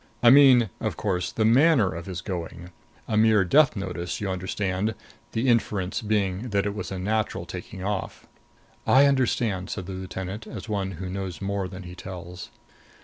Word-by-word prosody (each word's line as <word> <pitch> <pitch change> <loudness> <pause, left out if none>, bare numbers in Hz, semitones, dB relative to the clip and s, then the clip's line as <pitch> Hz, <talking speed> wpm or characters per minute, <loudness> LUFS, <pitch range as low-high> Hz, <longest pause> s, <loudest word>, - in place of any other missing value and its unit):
I 120 - +8
mean, 130 -6 +7
of - - -3
course, 90 -4 -1
the 110 - 0
manner 125 - +4
of 85 +3 -7
his 90 -2 -5
going. 85 -2 -6 0.4
A 110 - -1
mere 110 -2 +4
death 140 - +4
notice, 90 -3 -4
you 100 -2 -2
understand 95 +3 -2 0.4
the 115 +4 0
inference 105 -6 +1
being 105 0 -1
that 100 -2 +1
it 105 - -1
was 105 - -5
a 95 - -3
natural 110 +3 -1
taking 95 - -8
off." 100 -1 -4 0.6
"I 135 +2 +6
understand," 115 -8 +1
said 95 - -4
the 95 - -6
lieutenant, 95 +3 -6
as - - -8
one 100 -3 -2
who 95 +2 -6
knows 95 -1 -5
more 100 -1 -2
than 95 0 -9
he 90 0 -9
tells. 90 -1 -8
100 Hz, 175 wpm, -25 LUFS, 95-110 Hz, 0.6 s, I